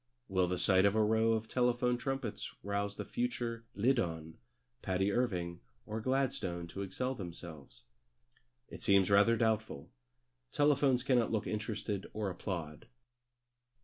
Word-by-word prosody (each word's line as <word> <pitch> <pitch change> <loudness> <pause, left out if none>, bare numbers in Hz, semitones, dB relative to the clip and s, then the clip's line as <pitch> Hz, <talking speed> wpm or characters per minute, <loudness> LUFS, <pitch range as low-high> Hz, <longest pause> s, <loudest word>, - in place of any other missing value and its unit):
Will 95 -1 +2
the 90 +1 -1
sight 95 +1 +4
of 100 +1 +3
a 110 - +4
row 110 +1 +3
of 110 0 -1
telephone 125 0 +2
trumpets 135 -3 -3
rouse 100 +1 -2
the - - -5
future 120 - -3
Liddon, 85 -9 0 0.4
Patti, 95 +2 0
Irving, 90 -7 -1 0.3
or 110 +1 -4
Gladstone 120 -9 -1
to 100 - -6
excel 125 +7 -2
themselves? 85 - -9 0.8
It - - -10
seems 100 -1 +4
rather 105 +4 +5
doubtful. 110 -10 -1 0.6
Telephones 140 -3 +3
cannot 125 -4 +2
look 110 -2 0
interested 105 -2 -3
or 105 -2 -2
applaud. 85 -1 -5
105 Hz, 130 wpm, -33 LUFS, 95-120 Hz, 0.8 s, rather